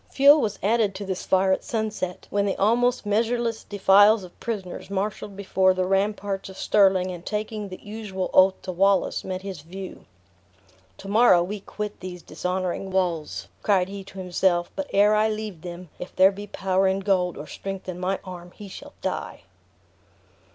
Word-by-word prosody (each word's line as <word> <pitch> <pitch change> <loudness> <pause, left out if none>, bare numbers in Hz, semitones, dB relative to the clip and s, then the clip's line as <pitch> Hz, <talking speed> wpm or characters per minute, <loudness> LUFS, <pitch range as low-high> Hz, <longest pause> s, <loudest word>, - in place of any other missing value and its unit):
Fuel 285 +2 +7
was 210 -4 -1
added 210 -1 +2
to 200 +1 -5
this 190 -1 -4
fire 190 0 +3
at 190 - +1
sunset, 215 -7 -3
when 200 0 +1
the 195 - 0
almost 240 +4 +2
measureless 230 +2 0
defiles 205 +1 +5
of 180 - -13
prisoners, 200 -6 -5
marshaled 200 0 -3
before 190 -1 +2
the 185 0 0
ramparts 195 0 -1
of 190 - -11
Stirling, 190 -3 +3
and 175 -1 -8
taking 210 0 -4
the 185 - -8
usual 205 -3 -5
oath 190 0 +5
to 185 - -4
Wallace, 195 +1 +2
met 185 0 -5
his 190 -6 -6
view. 185 +4 -9 0.9
"To 195 - -10
morrow 205 -4 +5
we 205 +4 -5
quit 210 +1 -6
these 180 -1 -8
dishonoring 185 +1 -3
wall," 175 -5 0 0.3
cried 190 -3 +2
he 200 0 -7
to 195 - -13
himself: 180 -1 0
"but 290 -1 -4
ere 205 +1 +5
I 215 +1 +3
leave 215 -6 -5
them, 175 0 -8
if 180 - -8
there 190 +1 +6
be 205 +1 -8
power 190 -1 +1
in 190 +1 0
gold, 185 -3 +1
or 145 - -7
strength 195 +4 -7
in 180 -1 -5
my 185 +2 0
arm, 180 -1 -9
he 210 - -10
shall 285 +9 -10
die!" - - -4
195 Hz, 180 wpm, -25 LUFS, 185-210 Hz, 0.9 s, Fuel